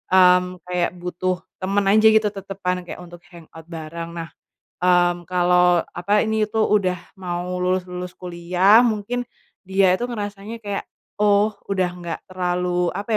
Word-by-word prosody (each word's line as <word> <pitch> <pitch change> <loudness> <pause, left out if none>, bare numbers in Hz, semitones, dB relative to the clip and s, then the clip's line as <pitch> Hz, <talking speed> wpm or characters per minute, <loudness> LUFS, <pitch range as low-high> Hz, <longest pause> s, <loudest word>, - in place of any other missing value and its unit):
mmm, 180 0 +4
kayak 180 0 -1
butuh 180 0 -3 0.2
teman 195 +1 +1
aja 215 +1 +6
gitu 215 -1 +4
tetepan, 185 -2 -4
kayak 180 - -8
untuk 175 0 -12
hangout 165 -2 -14
bareng. 165 +1 -7
Nah, 165 -1 -6 0.5
mmm, 175 -1 +2
kalo, 180 -1 +3
apa 200 +5 +1
ini 220 -1 0
tuh 220 0 +1
udah 185 -3 +2 0.2
mau 180 0 -3
lulus-lulus 180 0 -2
kuliah 180 +4 +3
mungkin, 240 +1 -1 0.4
dia 190 -1 +4
itu 240 +6 -1
ngerasanya 205 -1 -5
kayak, 200 -1 -4 0.3
oh 210 0 +4 0.2
udah 185 -2 0
nggak 170 -2 -5
terlalu 180 -1 -1
apa 205 +4 -5
180 Hz, 140 wpm, -22 LUFS, 175-205 Hz, 0.5 s, aja